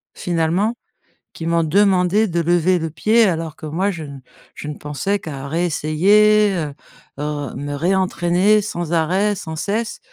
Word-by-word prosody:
Finalement 175 +6 0 0.6
qui 165 - -7
m'ont 170 0 +2
demandé 195 +4 +3
de 170 -1 -1
lever 175 +2 +2
le 160 0 -3
pied 220 +8 +3
alors 165 -4 -2
que - - -10
moi, 185 +6 0
je 165 -3 -7
ne 140 -2 -9 0.4
je 150 - -8
ne 150 - -5
pensais 150 +8 -2
qu'à 140 -3 -7
réessayer, 190 +6 +3
heu 150 -4 -3 0.5
heu, 145 -3 -4
me 145 0 -5
réentraîner 185 +4 +2
sans 175 -4 -4
arrêt, 190 +6 +1
sans 160 -3 -7
cesse. 215 +7 -3
175 Hz, 155 wpm, -19 LUFS, 155-200 Hz, 0.6 s, demandé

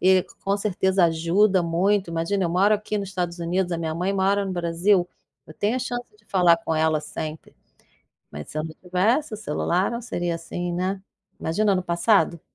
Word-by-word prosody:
e 185 0 +5 0.2
com 200 +1 +1
certeza 190 -2 +1
ajuda 175 +4 +3
muito. 185 +2 +1
Imagina, 170 +4 -1
eu - - +1
moro 195 +5 +4
aqui 210 0 -3
no 200 - -3
Estados 180 -2 -3
Unidos, 175 +2 -1
a 170 - -1
minha 160 -1 -2
mãe 180 +4 -1
mora 200 +1 +2
no 195 - -4
Brasil, 175 +2 +1 0.4
eu - - -12
tenho 215 +5 0
a - - 0
chance 245 -1 -3 0.2
de 210 - -28
falar 175 -3 +4
com 165 -1 -2
ela 155 -1 +2
sempre. 155 0 -7 0.8
Mas 75 0 -8
se 155 - -4
eu 155 - -2
não 160 -1 -7
tivesse 220 - +1
o - - -5
celular, 185 -1 0
não 235 - -3
seria 175 -7 -2
assim, 175 +1 -5
né. 185 +2 -2 0.4
Imagina 205 +6 +1
no 185 - 0
passado. 170 0 +2
180 Hz, 195 wpm, -24 LUFS, 170-200 Hz, 0.8 s, e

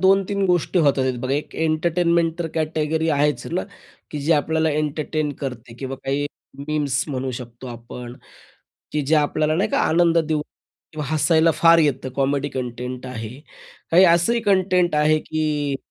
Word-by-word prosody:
2-3 195 +1 +3
गोष्टी 180 0 +1
होत 145 -4 +3
आहेत 130 -2 0
बघा. 130 +2 -2
एक 150 +1 -4
एंटरटेनमेंट 165 +1 +1
तर 170 - -2
कॅटेगरी 160 0 -1
आहेच 150 0 +1
ना, 180 +3 -1 0.5
की 150 - -4
जे 150 +4 +2
आपल्याला 160 +1 +1
एंटरटेन 150 0 -2
करते 125 -4 -6
किंवा 135 0 -5
काही 140 +2 0 0.4
मीम्स 145 -3 0
म्हणू 130 -2 -3
शकतो 120 0 -8
आपण 120 0 -8 0.8
की 150 - 0
ज्या 150 +2 +3
आपल्याला 155 +1 0
नाही 200 +4 +1
का - - +1
आनंद 170 +1 +3
देऊ 155 -2 0 0.5
किंवा 155 -1 -4
हसायला 160 +1 +3
फार 165 0 +6
येतं 140 -4 +1
कॉमेडी 140 +1 0
कंटेंट 125 -1 -5
आहे. 120 +1 -7 0.5
काही 180 +3 +7
असंही 175 +7 +3
कंटेंट 185 -4 +2
आहे 150 +1 +3
की 150 -3 -1
150 Hz, 155 wpm, -22 LUFS, 135-165 Hz, 0.8 s, काही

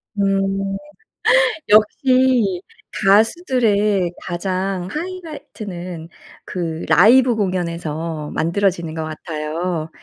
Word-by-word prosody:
음 195 -1 0 0.9
역시 225 -2 +3 0.3
가수들의 210 - +2
가장 185 +1 -3
하이라이트는 215 - -7 0.4
그 165 -3 -4
라이브 240 +6 +6
공연에서 170 -5 -3
만들어지는 170 -1 0
것 160 0 -4
같아요. 155 +1 -4
190 Hz, 190 characters per minute, -20 LUFS, 170-215 Hz, 0.9 s, 라이브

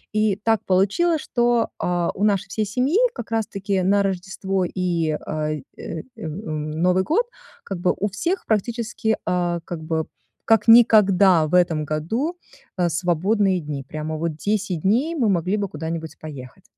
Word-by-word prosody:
И 215 -2 +2
так 225 -2 +2
получилось, 205 - +2
что, 240 -1 +1
а, 175 -1 0
у 200 - -3
нашей 200 -3 +2
всей 215 +2 -1
семьи 255 - +1 0.2
как 235 -2 -8
раз 225 -1 0
таки 195 -1 -2
на 200 +2 +3
Рождество 190 0 -2
и, 170 -4 -1
ай, 155 -1 -2
э, 165 - -6
эм, 160 +4 -6
эм, 155 -1 -3
Новый 180 +4 +2
год, 415 - +1 0.4
как 195 -3 -5
бы 180 - +2
у 205 - +1
всех 335 - -2
практически, 220 0 -1
а, 175 -1 0
как 175 - -5
бы, 160 0 -1 0.4
как 225 -1 +3
никогда 200 -7 +6
в 155 - -8
этом 170 -4 +3
году, 225 - -2 0.4
э, 175 -2 +2
свободные 185 +3 +1
дни. 145 -3 -5
Прямо 155 +1 -4
вот 165 -1 -2
10 200 -2 -1
дней 255 - +1
мы 245 -9 +1
могли 185 +2 +1
бы 200 -1 -1
куда-нибудь 160 0 -5
поехать. 135 -6 -10
190 Hz, 165 wpm, -22 LUFS, 165-215 Hz, 0.4 s, никогда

